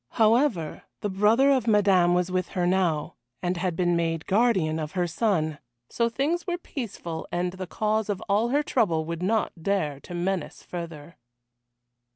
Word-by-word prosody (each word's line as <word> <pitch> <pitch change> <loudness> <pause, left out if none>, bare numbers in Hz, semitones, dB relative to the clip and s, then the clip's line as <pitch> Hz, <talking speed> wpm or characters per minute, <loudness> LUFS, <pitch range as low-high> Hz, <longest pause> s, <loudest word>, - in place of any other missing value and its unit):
However, 220 - +2 0.2
the 205 - -2
brother 220 +8 +4
of 255 -4 +2
Madame 195 -5 +4
was 180 0 0
with 185 -1 0
her 175 - +2
now, 175 -5 0 0.3
and 180 0 0
had 180 -1 -1
been 175 -1 +2
made 165 -1 -1
guardian 190 -7 +2
of 155 +1 -5
her 180 -2 +1
son 165 -5 0 0.3
so 235 0 +1
things 310 +9 -1
were 350 -1 -1
peaceful 205 - -6
and 175 +1 -1
the 185 -1 -6
cause 215 +2 -1
of 200 -2 -1
all 210 +4 +2
her 290 +4 +2
trouble 175 - +1
would 170 +1 -4
not 215 +4 +1
dare 160 -7 0
to 175 - -9
menace 180 -1 -2
further. 165 -3 -8
185 Hz, 170 wpm, -26 LUFS, 170-220 Hz, 0.3 s, brother